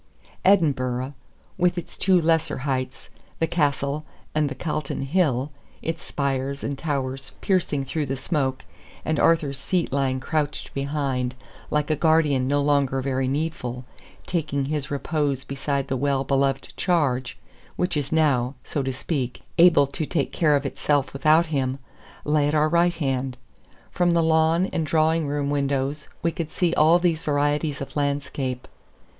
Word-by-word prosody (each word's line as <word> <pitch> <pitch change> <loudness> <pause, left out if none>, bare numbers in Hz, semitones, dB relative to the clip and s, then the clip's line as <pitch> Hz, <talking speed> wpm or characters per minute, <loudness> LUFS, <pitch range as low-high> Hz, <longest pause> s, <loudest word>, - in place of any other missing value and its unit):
Edinburgh 135 -8 +2 0.5
with 180 0 +2
its 175 - -6
two 185 -1 +3
lesser 160 -3 +1
heights, 130 -2 -3 0.3
the 165 - +2
Castle 145 -3 0 0.3
and 150 -2 +1
the 140 - -5
Calton 150 -1 -3
Hill, 140 -3 +1 0.3
its 165 0 -3
spires 140 0 -2
and 140 - -2
towers 135 -3 -3
piercing 160 -8 0
through 150 +2 -2
the 135 +1 -2
smoke, 130 -2 -1 0.4
and 155 -1 0
Arthur's 150 -5 +2
Seat 175 0 -1
lying 135 -2 +1
crouched 145 +1 -2
behind, 135 -3 -1 0.3
like 150 0 0
a - - +3
guardian 150 -4 +3
no 145 +1 +2
longer 140 -2 +2
very 130 0 -1
needful, 130 -4 -3 0.4
taking 150 -5 -1
his 150 0 -2
repose 145 -2 -1
beside 140 0 -2
the 135 - -1
well 135 0 +1
beloved 135 0 0
charge, 135 -9 0 0.4
which 180 -1 0
is 145 -2 -2
now, 140 -5 +2
so 145 - -2
to 135 0 -1
speak, 130 -2 -3 0.2
able 165 -5 +7
to 145 +2 -4
take 155 -6 -1
care 150 -3 +3
of 140 0 0
itself 140 0 0
without 155 +4 +4
him 130 -1 0 0.5
lay 150 -1 +2
at 150 - 0
our 155 0 +3
right 170 +1 +3
hand. 135 -4 -2 0.5
From 175 -1 +2
the 170 -1 +3
lawn 160 +2 +3
and 165 - 0
drawing 160 0 +2
room 145 0 -1
windows 140 +1 -1
we 170 - +2
could 165 -1 -4
see 175 0 0
all 160 +3 +5
these 170 -3 +1
varieties 145 0 0
of 135 - -7
landscape. 140 -3 -2
145 Hz, 155 wpm, -24 LUFS, 135-160 Hz, 0.5 s, able